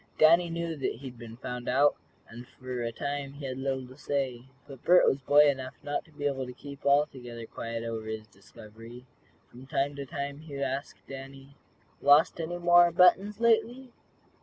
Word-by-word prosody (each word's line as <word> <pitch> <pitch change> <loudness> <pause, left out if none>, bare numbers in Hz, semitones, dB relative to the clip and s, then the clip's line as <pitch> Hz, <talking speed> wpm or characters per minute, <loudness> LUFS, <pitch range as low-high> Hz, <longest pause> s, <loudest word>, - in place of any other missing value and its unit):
Danny 170 +2 +5
knew 170 0 -3
that 135 - -2
he 130 +3 -8
had 120 -1 -15
been 115 -1 -10
found 125 -1 -5
out, 140 +3 +4 0.3
and 120 +2 -11
for 130 -1 -6
a 115 0 -2
time 140 +2 -4
he 140 0 -8
had 130 0 -5
little 135 -1 -2
to 130 - -14
say. 135 -4 -3 0.2
But 135 -3 -12
Bert 180 +1 +6
was 135 - +1
boy 145 +2 +6
enough 130 -2 -2
not 145 - -3
to 160 - -22
be 145 -1 -7
able 135 -2 -1
to 125 - -8
keep 140 +2 -11
altogether 130 -5 0
quiet 115 0 -6
over 115 -1 -5
his 110 0 -5
discovery. 110 +4 -14 0.5
From 130 +2 -13
time 140 +1 -1
to 140 -1 -6
time 140 +1 -5
he 155 -2 -10
would 140 - -2
ask 140 +1 -4
Danny: 135 0 -10 0.5
"Lost 145 +4 +5
any 170 +2 -4
more 175 0 +6
buttons, 190 +4 +4
lately?" 235 +2 +1
140 Hz, 190 wpm, -29 LUFS, 125-150 Hz, 0.5 s, Bert